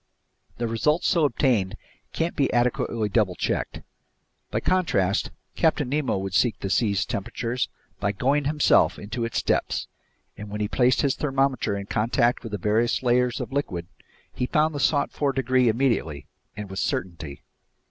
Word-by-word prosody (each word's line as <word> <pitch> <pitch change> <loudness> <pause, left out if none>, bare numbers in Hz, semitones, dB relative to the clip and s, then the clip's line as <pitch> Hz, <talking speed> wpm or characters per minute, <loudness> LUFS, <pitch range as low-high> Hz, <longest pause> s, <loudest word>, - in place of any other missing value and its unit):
The 120 - -1
results 150 +9 +1
so 170 -5 +3
obtained 115 -7 +1 0.4
can't 165 +1 -2
be 140 - +1
adequately 120 -2 +1
double 100 -3 +1
checked. - - -2 0.7
By - - -1
contrast, 110 - +1 0.3
Captain 155 -4 +2
Nemo 140 -6 0
would 95 0 -4
seek 115 +2 +2
the 95 - -3
sea's 105 -4 +2
temperature 115 +4 -3 0.4
by 100 0 0
going 135 +8 +1
himself 150 +1 +3
into 115 +3 -4
its 115 - -2
depths, - - 0 0.5
and 105 0 -8
when 105 +1 -5
he 105 - 0
placed 125 +3 +2
his 140 -2 +2
thermometer 135 -7 0
in 100 - -5
contact 115 +3 +1
with 115 - -8
the 105 - -2
various 110 +6 +1
layers 125 0 +2
of - - -5
liquid, 95 -12 -2 0.5
he 125 - -2
found 155 +3 +2
the 145 - -4
sought 140 +1 +2
for 140 -2 0
degree 130 -2 +2
immediately 110 - 0 0.3
and 105 -1 -5
with 95 - -4
certainty. 85 -7 -3
120 Hz, 160 wpm, -25 LUFS, 105-135 Hz, 0.7 s, so